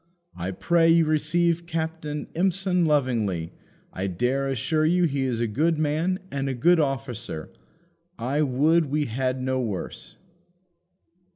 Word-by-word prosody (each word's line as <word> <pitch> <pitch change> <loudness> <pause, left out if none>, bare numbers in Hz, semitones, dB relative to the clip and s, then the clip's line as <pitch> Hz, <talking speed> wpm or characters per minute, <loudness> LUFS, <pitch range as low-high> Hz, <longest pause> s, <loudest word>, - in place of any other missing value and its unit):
I 90 +1 -4
pray 165 - +2
you 165 0 +5
receive 170 +2 +1
Captain 160 -2 -3
Empson 180 0 +1
lovingly: 115 - 0 0.4
I 95 +1 -2
dare 125 +9 0
assure 145 +4 0
you 175 +3 +3
he 140 -5 +1
is 120 -3 -1
a 120 - +1
good 155 +9 +1
man 155 +5 0
and 140 -1 -2
a 130 - -2
good 170 +8 +4
officer; 130 - -3 0.7
I 135 +6 -1
would 150 +4 +3
we 150 +2 0
had 130 +2 -1
no 130 0 0
worse." 105 -6 -5
145 Hz, 135 wpm, -25 LUFS, 125-165 Hz, 0.7 s, you